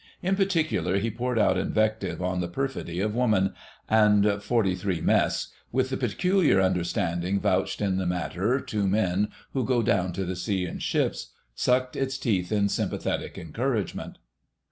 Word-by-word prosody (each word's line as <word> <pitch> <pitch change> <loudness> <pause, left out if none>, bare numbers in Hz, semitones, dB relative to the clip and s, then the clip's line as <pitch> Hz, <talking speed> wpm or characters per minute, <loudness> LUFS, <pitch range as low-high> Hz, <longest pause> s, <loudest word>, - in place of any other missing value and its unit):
In 190 +2 +2
particular, 160 - +1
he 110 +3 -1
poured 125 +2 -2
out 95 -4 +3
invective 110 -3 0
on 90 0 -1
the 85 - -2
perfidy 90 -4 -3
of 105 +1 0
Woman, 105 -6 +2 0.3
and 105 -2 +4
43 95 -5 0
Mess, - - +1 0.2
with 130 +1 0
the - - 0
peculiar 165 - +2
understanding 90 0 0
vouched - - 0
in 95 -2 +1
the 95 -1 -1
matter 90 +7 0
to 105 -6 -2
men 95 0 +1 0.3
who 130 - 0
go 120 -1 +1
down 95 -3 +1
to 95 +2 -2
the 90 +1 -3
sea 95 0 -1
in 85 - -6
ships, - - -1 0.2
sucked 125 - +1
its 135 -1 -1
teeth 100 -8 -1
in 100 -1 +2
sympathetic - - -2
encouragement. 115 - -3
105 Hz, 155 wpm, -26 LUFS, 95-125 Hz, 0.3 s, and